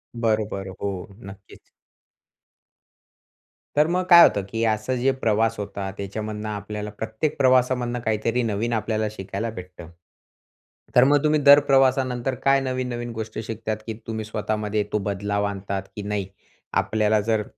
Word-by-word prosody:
बरोबर, 110 Hz, -4 st, -1 dB
हो, 95 Hz, -3 st, -3 dB, 0.2 s
नक्कीच. 95 Hz, 0 st, -13 dB, 2.2 s
तर 150 Hz, +1 st, +5 dB
मग 180 Hz, +2 st, 0 dB
काय 170 Hz, -1 st, +10 dB
होतं 100 Hz, -, +3 dB
की 115 Hz, +1 st, -2 dB
असं, 110 Hz, +3 st, 0 dB
जे 130 Hz, +2 st, +2 dB
प्रवास 115 Hz, -3 st, +1 dB
होता 100 Hz, -1 st, -4 dB
त्याच्यामधनं 105 Hz, +2 st, -5 dB
आपल्याला 105 Hz, 0 st, -5 dB
प्रत्येक 110 Hz, +7 st, -2 dB
प्रवासामधनं 125 Hz, -2 st, +2 dB
काहीतरी 110 Hz, +3 st, 0 dB
नवीन 115 Hz, +1 st, -1 dB
आपल्याला 110 Hz, 0 st, -1 dB
शिकायला 100 Hz, +2 st, -4 dB
भेटतं. 90 Hz, -4 st, -10 dB, 1.1 s
तर 125 Hz, -, +8 dB
मग 145 Hz, +2 st, +4 dB
तुम्ही 155 Hz, 0 st, +3 dB
दर 140 Hz, 0 st, +9 dB
प्रवासानंतर 130 Hz, -1 st, +2 dB
काय 135 Hz, 0 st, +5 dB
नवीन-नवीन 125 Hz, -2 st, -3 dB
गोष्टी 110 Hz, -1 st, -5 dB
शिकता, 110 Hz, 0 st, -4 dB
की 110 Hz, +1 st, -7 dB
तुम्ही 110 Hz, -1 st, -4 dB
स्वतःमध्ये 105 Hz, 0 st, -2 dB
तो -, -, +3 dB
बदलाव 100 Hz, +1 st, -1 dB
आणता 100 Hz, -1 st, -3 dB, 0.2 s
की 105 Hz, -, -5 dB
नाही? 100 Hz, -2 st, -2 dB, 0.5 s
आपल्याला 110 Hz, 0 st, +2 dB
जर 110 Hz, 0 st, 0 dB
110 Hz, 135 wpm, -24 LUFS, 105-125 Hz, 2.2 s, काय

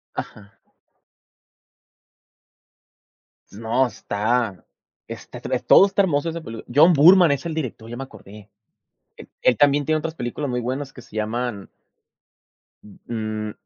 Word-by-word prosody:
Ajá. 105 Hz, 0 st, -9 dB, 2.9 s
No, 115 Hz, +5 st, 0 dB
está 110 Hz, -3 st, -2 dB, 0.4 s
está -, -, -9 dB
tre -, -, -2 dB
todo 195 Hz, -, +6 dB
está 200 Hz, 0 st, +1 dB
hermoso 165 Hz, -3 st, 0 dB
esa 165 Hz, 0 st, -6 dB
pelí 115 Hz, -5 st, -9 dB
John 160 Hz, +5 st, +6 dB
Boorman, 170 Hz, +2 st, +7 dB
es 140 Hz, +4 st, -2 dB
el 165 Hz, -, -3 dB
director, 125 Hz, -7 st, -5 dB
ya 120 Hz, -, -7 dB
me 135 Hz, -, -5 dB
acordé. 105 Hz, -4 st, -14 dB, 0.7 s
E -, -, -12 dB
él 125 Hz, -, +3 dB
también 145 Hz, -1 st, +3 dB
tiene 155 Hz, 0 st, +1 dB
otras 160 Hz, +1 st, -5 dB
películas 130 Hz, +3 st, -4 dB
muy 125 Hz, 0 st, -1 dB
buenas 135 Hz, +3 st, -4 dB
que 125 Hz, -, -12 dB
se 110 Hz, -, -17 dB
llaman 110 Hz, -1 st, -3 dB, 1.4 s
mm, 110 Hz, -2 st, -4 dB
125 Hz, 130 wpm, -22 LUFS, 110-150 Hz, 2.9 s, Boorman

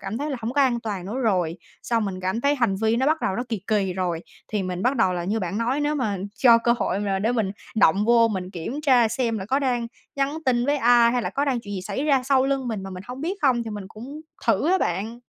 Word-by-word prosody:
cảm 220 Hz, +5 st, -4 dB
thấy 295 Hz, +1 st, -3 dB
là 270 Hz, -, -2 dB
hổng 225 Hz, +2 st, -3 dB
có 285 Hz, -, +2 dB
an 245 Hz, -3 st, +2 dB
toàn 200 Hz, -5 st, -4 dB
nữa 235 Hz, +6 st, -4 dB
rồi, 180 Hz, -6 st, +1 dB, 0.3 s
xong 230 Hz, -2 st, 0 dB
mình 185 Hz, -2 st, -4 dB
cảm 190 Hz, +5 st, -1 dB
thấy 285 Hz, +2 st, +2 dB
hành 235 Hz, -8 st, +1 dB
vi 220 Hz, +3 st, +1 dB
nó 260 Hz, +3 st, +1 dB
bắt 315 Hz, +1 st, +2 dB
đầu 190 Hz, -, -1 dB
nó 245 Hz, -, -1 dB
kì 220 Hz, -5 st, -3 dB
kì 200 Hz, -4 st, +1 dB
rồi. 175 Hz, -3 st, -2 dB, 0.3 s
Thì 210 Hz, -3 st, -1 dB
mình 180 Hz, 0 st, -4 dB
bắt 255 Hz, +3 st, +1 dB
đầu 190 Hz, -5 st, +3 dB
là 175 Hz, -1 st, -3 dB
như 215 Hz, +4 st, -1 dB
bạn 185 Hz, +3 st, -3 dB
nói 250 Hz, +5 st, 0 dB
nếu 295 Hz, +1 st, 0 dB
mà 220 Hz, -9 st, -1 dB, 0.2 s
cho 235 Hz, -1 st, +6 dB
cơ 235 Hz, +1 st, +2 dB
hội 190 Hz, -, 0 dB
mà 200 Hz, -2 st, -1 dB
để 220 Hz, +5 st, +1 dB
mình 220 Hz, -5 st, 0 dB, 0.3 s
động 200 Hz, 0 st, +4 dB
vô 230 Hz, 0 st, +5 dB
mình 185 Hz, -3 st, -4 dB
kiểm 215 Hz, -, -5 dB
tra 255 Hz, -6 st, +4 dB
xem 230 Hz, 0 st, -1 dB
là 190 Hz, -, -5 dB
có 265 Hz, +4 st, +1 dB
đang 245 Hz, -4 st, 0 dB, 0.3 s
nhắn 275 Hz, +3 st, 0 dB
tin 245 Hz, -1 st, +2 dB
với 290 Hz, -, +2 dB
ai 240 Hz, -2 st, +5 dB
hay 245 Hz, -2 st, 0 dB
là -, -, -2 dB
có 280 Hz, -, 0 dB
chuyện 235 Hz, -6 st, -2 dB
gì 185 Hz, -, -3 dB
xảy 265 Hz, +9 st, -3 dB
ra 275 Hz, -4 st, +3 dB
sau 265 Hz, 0 st, +3 dB
lưng 270 Hz, -2 st, -1 dB
mình 215 Hz, -4 st, -3 dB
mà 195 Hz, -, -7 dB
mình 185 Hz, 0 st, -7 dB
hông 250 Hz, +2 st, -7 dB
biết 345 Hz, +6 st, -2 dB
không, 250 Hz, -4 st, +3 dB
thì 225 Hz, -, -6 dB
mình 205 Hz, -2 st, -6 dB
cũng 255 Hz, +10 st, -9 dB, 0.3 s
thử 320 Hz, -, +2 dB
á 380 Hz, -, +4 dB
bạn. 210 Hz, +7 st, -2 dB
230 Hz, 280 wpm, -24 LUFS, 195-260 Hz, 0.3 s, cho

